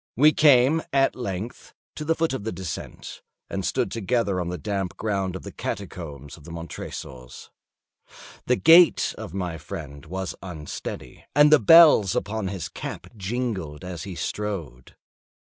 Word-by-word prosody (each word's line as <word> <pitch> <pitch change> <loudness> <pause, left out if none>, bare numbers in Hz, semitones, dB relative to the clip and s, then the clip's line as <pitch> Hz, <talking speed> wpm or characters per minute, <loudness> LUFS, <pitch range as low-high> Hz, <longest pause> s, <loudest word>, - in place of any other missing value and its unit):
We 150 +4 +6
came 145 +1 +5
at 135 0 +2
length 110 -2 -6 0.2
to 155 - -6
the 165 +2 +1
foot 165 -3 0
of 130 - -4
the 110 - -3
descent, 90 -2 -7 0.3
and - - -2
stood - - -1
together 110 -3 0
on 85 - -3
the 90 - -4
damp 100 -3 -3
ground 95 -4 -2
of 95 - -7
the - - -8
catacombs 80 -8 -6
of 80 - -16
the 85 - -12
Montresors. 70 -6 -8 1.0
The 125 - +4
gait 165 +5 +6
of 90 - -8
my 90 -4 -3
friend 70 -2 -8
was 95 +2 -4
unsteady, 80 -5 -7
and 150 +1 +6
the 155 - +8
bells 150 - +7
upon 110 -1 -2
his 95 -4 -4
cap - - -7
jingled 95 - -4
as 90 -2 -6
he 95 -3 -7
strode. 85 -13 -5
95 Hz, 155 wpm, -25 LUFS, 85-125 Hz, 1.0 s, the